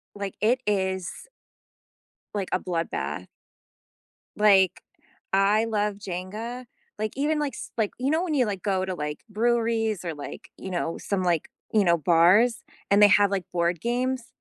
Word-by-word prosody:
like, 200 -2 -5
it 240 +5 +3
is 190 -3 0 1.3
like, 195 -3 -2
a 185 - +3
bloodbath. 170 -2 -3 1.1
Like, 195 -3 +4 0.5
I 200 +3 +4
love 210 -2 0
Jenga. 210 +6 -6 0.3
Like, 215 0 -2
even, 300 +3 +1
like, 295 -2 -2
s - - -8
like, 220 -3 +1
you 260 +3 0
know, 320 +3 +2
when 315 -4 -1
you, 255 -5 +3
like, 195 -3 -4
go 190 -2 0
to, 185 - -3
like, 150 -2 -4
breweries, 225 -2 0
or, 170 -2 -3
like, 145 -1 -9
you 190 - -7
know, 170 -2 -2
some, 200 -2 -2
like, 175 -3 0 0.2
you 215 -3 +4
know, 170 -1 +4
bars, 180 - +4 0.3
and 200 +1 +5
they 205 - +9
have, 200 +1 +5
like, 195 -2 -1
board 170 -1 0
games? 250 +1 -1
205 Hz, 160 wpm, -26 LUFS, 185-230 Hz, 1.3 s, they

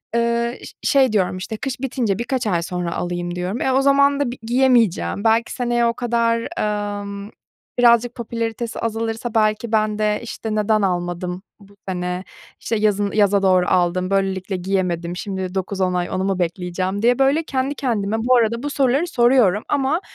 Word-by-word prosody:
eee, 235 +1 0
ş - - -10
şey 265 -3 +3
diyorum, 185 -3 +1
işte, 215 +4 -5
kış 260 +2 -4
bitince 235 -6 -1
birkaç 245 0 -2
ay 175 -5 +1
sonra 175 -1 -3
alayım 175 0 -3
diyorum. 180 +6 -3
E, 265 - +1
o 265 - +3
zaman 280 0 +4
da 280 -4 0
bi 250 - -8
giyemeyeceğim, 235 -5 +2
belki 225 +1 +2
seneye 240 -1 0
o 235 - +2
kadar, 235 -1 0 0.5
emm, 200 0 -7 0.5
birazcık 240 0 +4
popülaritesi 230 -1 -4
azalırsa, 225 +1 -3
belki, 215 +1 +1
ben 215 -1 +1
de, 210 0 +1
işte, 220 -1 -5
"Neden 215 0 +2
almadım 180 -1 -2 0.2
bu 200 0 -18
sene, 180 0 -3 0.4
işte, 230 - -2
yazın 205 -1 +1
yaza 205 -2 +3
doğru 185 -2 +3
aldım, 180 +1 +1
böylelikle 195 0 -1
giyemedim, 180 -2 -2
şimdi 190 -1 -4
9-10 190 -1 -1
ay 180 -1 -1
onu 185 - -2
mu 195 -1 -1
bekleyeceğim?" 180 +3 -2
diye, 245 +2 +3
böyle, 275 +4 +3
kendi 270 -1 -2
kendime 220 -6 -1
bu 250 +3 +3
arada 235 +1 +1
bu 290 - -2
soruları 280 +3 +1
soruyorum 240 - +3
ama 285 +4 +1
215 Hz, 170 wpm, -21 LUFS, 185-240 Hz, 0.5 s, zaman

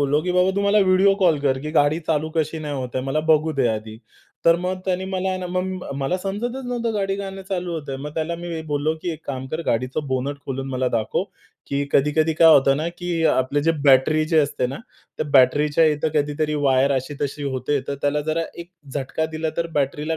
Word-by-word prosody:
बोललो 145 +1 +2
की, 180 +1 -1
"बाबा, 180 +1 +3
तू - - +2
मला 200 +1 +3
व्हिडिओ 190 +1 +4
कॉल 165 -5 +4
कर, 135 -2 +1
की 150 +3 -5
गाडी 150 0 +3
चालू 155 0 0
कशी 160 0 -1
नाही 150 -2 -4
होत 130 -2 -3
आहे. 130 - -2
मला 135 +3 0
बघू 155 0 +3
दे 135 -4 +1
आधी." 110 0 -4 0.5
तर 165 0 +6
मग 185 +1 -2
त्याने 185 0 -1
मला 190 0 -1
ना, 185 - -4
मग 185 -2 -3
मला 140 +6 -1
समजतच 230 +8 -4
नव्हतं 240 -2 -2
गाडी 195 -1 -1
का 200 -1 -4
नाही 195 0 -8
चालू 180 -2 -2
होतंय. 145 -4 -4
मग 145 +3 -7
त्याला 160 +1 -2
मी 170 -2 -5
बोललो 145 +2 0
की, 175 - -2
"एक 160 - -11
काम 130 -2 -4
कर, 155 - -3
गाडीचं 130 +5 -1
बोनेट 130 +2 -2
खोलून 135 0 -4
मला 130 0 0
दाखव. 110 - -1 0.4
की 140 0 -1
कधी-कधी 155 +3 +3
काय 165 0 +6
होतं 135 0 +4
ना, 155 +3 -1
की 175 -2 -1
आपलं 130 +3 +1
जे 165 - +5
बॅटरी 140 +3 +5
जे 160 - +5
असते 140 -4 +1
ना, 130 - -5 0.4
त्या 155 - -2
बॅटरीच्या 145 +4 +4
इथं 150 +2 -1
कधीतरी 150 +1 0
वायर 135 +1 +3
अशी-तशी 140 +2 -3
होते. 140 +3 -1
तर 140 - -1
त्याला 145 +1 +1
जरा 155 +2 -1 0.2
एक 170 +1 -8 0.2
झटका 145 +3 -2
दिला, 160 0 -2
तर 170 - 0
बॅटरीला 150 +4 -2
155 Hz, 215 wpm, -22 LUFS, 140-175 Hz, 0.5 s, तर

